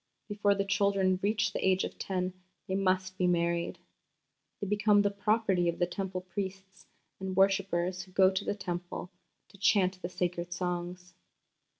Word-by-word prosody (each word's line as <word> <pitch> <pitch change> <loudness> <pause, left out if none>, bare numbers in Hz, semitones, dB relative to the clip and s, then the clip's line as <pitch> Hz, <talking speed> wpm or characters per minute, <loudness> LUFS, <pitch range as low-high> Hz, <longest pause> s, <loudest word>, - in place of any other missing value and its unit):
Before 205 -1 +2
the 200 0 0
children 195 -2 +2
reach 210 0 +1
the - - -2
age 190 0 +3
of - - -6
ten 185 -1 -2 0.3
they 190 - -2
must 185 -1 0
be 180 - +3
married.... 170 0 0 0.8
They - - -3
become 210 0 +3
the 205 - +2
property 200 -3 +1
of 170 - -2
the 175 - +2
Temple 185 0 -4
priests 190 +1 -6 0.3
and 190 -1 -4
worshippers 190 -2 +2
who 185 0 -13
go 190 0 +5
to 190 +1 -2
the - - -1
Temple 175 -1 -5 0.4
to 200 - -17
chant 185 -2 +3
the 175 - -4
sacred 175 -1 -2
songs." 180 0 -4
190 Hz, 165 wpm, -30 LUFS, 180-200 Hz, 0.8 s, go